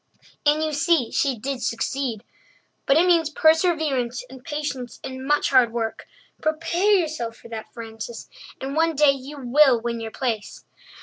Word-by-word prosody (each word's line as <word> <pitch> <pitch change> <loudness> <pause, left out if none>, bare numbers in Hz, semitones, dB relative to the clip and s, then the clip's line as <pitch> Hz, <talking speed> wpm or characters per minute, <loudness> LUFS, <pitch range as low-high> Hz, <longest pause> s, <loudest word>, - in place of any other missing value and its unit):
And 300 +1 +4
you 310 -1 -1
see 300 -4 +2
she 270 -4 +1
did 265 +3 -4
succeed. 235 -1 -2 0.6
But 275 - +5
it 340 - +5
means 335 -4 +3
perseverance 310 -7 +2
and 260 -1 -12
patience 290 -6 -5
and 260 0 -6
much 295 0 +2
hard 255 -4 +5
work. 225 -1 -4 0.3
Prepare 330 +6 +1
yourself 305 -10 -2
for 235 - -14
that, 225 -1 -7
Frances, 225 0 -8 0.3
and 270 +2 -4
one 325 0 +2
day 295 0 +6
you 275 +2 -7
will 260 0 +4
win 235 0 -3
your 225 0 -5
place. 225 -3 -4
275 Hz, 160 wpm, -23 LUFS, 235-310 Hz, 0.6 s, day